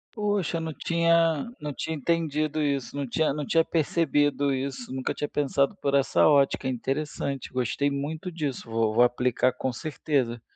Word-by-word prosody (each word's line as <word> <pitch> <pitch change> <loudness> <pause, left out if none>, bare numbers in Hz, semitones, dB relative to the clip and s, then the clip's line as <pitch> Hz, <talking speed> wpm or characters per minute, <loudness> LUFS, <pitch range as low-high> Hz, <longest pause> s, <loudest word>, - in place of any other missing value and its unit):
Poxa, 205 -6 0
não 160 -1 -4
tinha 170 -1 +2 0.2
não 150 0 -3
tinha 160 +3 -3
entendido 155 0 0
isso, 140 -3 -1
não 140 -1 -2
tinha 155 +6 +1
não 150 0 -3
tinha 165 +4 +3
percebido 145 -3 +1
isso. 130 -2 -4
Nunca 130 0 -2
tinha 145 - -4
pensado 140 +3 +1
por 140 - 0
essa 140 -1 +4
ótica. 140 -3 +3
É - - 0
interessante, 135 +1 -3
gostei 130 +3 0
muito 155 +6 -4
disso, 145 -8 -4
vou 115 -1 +1
vou 120 - +6
aplicar, 125 +1 +2
com 130 +1 -2
certeza, 130 -4 -2
145 Hz, 165 wpm, -26 LUFS, 130-160 Hz, 0.2 s, vou